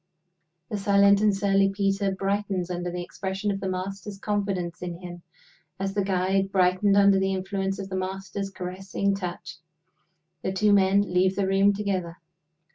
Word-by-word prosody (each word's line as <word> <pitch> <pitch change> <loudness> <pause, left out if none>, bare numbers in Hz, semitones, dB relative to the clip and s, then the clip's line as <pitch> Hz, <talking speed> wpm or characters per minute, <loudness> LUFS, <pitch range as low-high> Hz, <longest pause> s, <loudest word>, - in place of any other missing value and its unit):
The 210 - -2
silent 200 0 +4
and 210 -2 +3
surly 195 0 +3
Peter 195 0 0
brightens 195 -1 -2
under 175 0 -3
the 175 0 -4
expression 190 +3 -3
of 195 - -3
the 195 -1 -3
Master's 195 +2 -5
confidence 195 -4 -2
in 175 -1 -5
him, 175 -1 -9 0.6
as 195 0 -2
the 205 - +1
guide 190 0 0
brightened 190 +2 +3
under 200 -1 +5
the 190 0 0
influence 195 0 -2
of 195 - -5
the 190 - -4
Master's 190 +1 -4
caressing 190 +1 -3
touch. 175 -3 -6 0.8
The 190 - -2
two 205 +2 +3
men 200 0 +4
leave 185 +1 +3
the 200 - 0
room 195 +1 +4
together. 190 -4 -3
195 Hz, 160 wpm, -26 LUFS, 185-200 Hz, 0.8 s, under